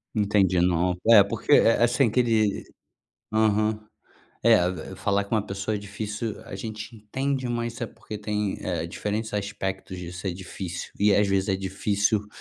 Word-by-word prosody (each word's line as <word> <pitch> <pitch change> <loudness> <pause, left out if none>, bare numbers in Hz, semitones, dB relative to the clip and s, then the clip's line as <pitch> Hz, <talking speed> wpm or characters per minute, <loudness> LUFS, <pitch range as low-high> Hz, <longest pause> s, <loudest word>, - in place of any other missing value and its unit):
Entendi. 100 -3 +3
Não, 90 0 +2
eh, 105 -4 +9
porque, 100 +8 -4
eh 115 -4 +6
eh, - - +4
assim 120 +1 +3
que 120 - +1
ele. 110 -4 +2 0.7
Aham. 110 0 +2 0.7
É, 90 -7 +2
falar 100 0 +1
com 105 +3 -1
uma 105 - -1
pessoa 100 +2 -2
é - - -4
difícil, 105 +2 -4
a 95 - -7
gente 110 +2 -7
entende 130 +4 -2
mas 120 +1 -3
é 115 - -1
porque 105 -1 -9
tem, 105 -1 -2
eh, - - -3
diferentes 110 +1 -3
aspectos 95 -2 -4
disso, 90 +2 -7
é 90 - 0
difícil 90 -1 -6
e 105 0 +4
às 105 -1 +3
vezes 95 0 +1
é 95 - +2
difícil 100 +2 0
105 Hz, 170 wpm, -25 LUFS, 95-110 Hz, 0.7 s, eh